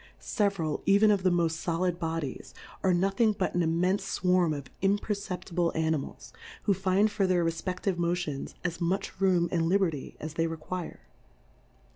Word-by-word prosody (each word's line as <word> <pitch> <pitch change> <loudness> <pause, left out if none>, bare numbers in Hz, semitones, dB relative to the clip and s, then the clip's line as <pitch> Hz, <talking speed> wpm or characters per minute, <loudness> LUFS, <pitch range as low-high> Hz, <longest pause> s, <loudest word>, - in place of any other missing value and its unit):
Several, 195 - -1
even 205 +2 +6
of 200 -2 +2
the 185 - +3
moft 165 -2 0
folid 175 +1 0
Bodies, 160 -4 -4 0.3
are 190 - +3
nothing 195 +5 +2
but 190 -2 -2
an 175 - +1
immenfe 175 +4 +1 0.2
fwarm 180 -4 +3
of 140 -2 -8
im 195 +2 +3
perceptible 185 -5 -2
Animals, 160 -3 -2 0.3
who 200 - +3
find 195 +3 +2
for 200 -2 +1
their 175 -2 +2
refpeftive 180 +2 -2
Motions 170 -5 -2
as 175 -1 -3
much 185 +2 -2
room 180 -3 +3
and 165 -2 +1
li 190 +4 +4
berty 165 -8 -2
as 155 0 -6
they 165 0 0
require. 165 - -6
180 Hz, 160 wpm, -29 LUFS, 165-195 Hz, 0.3 s, even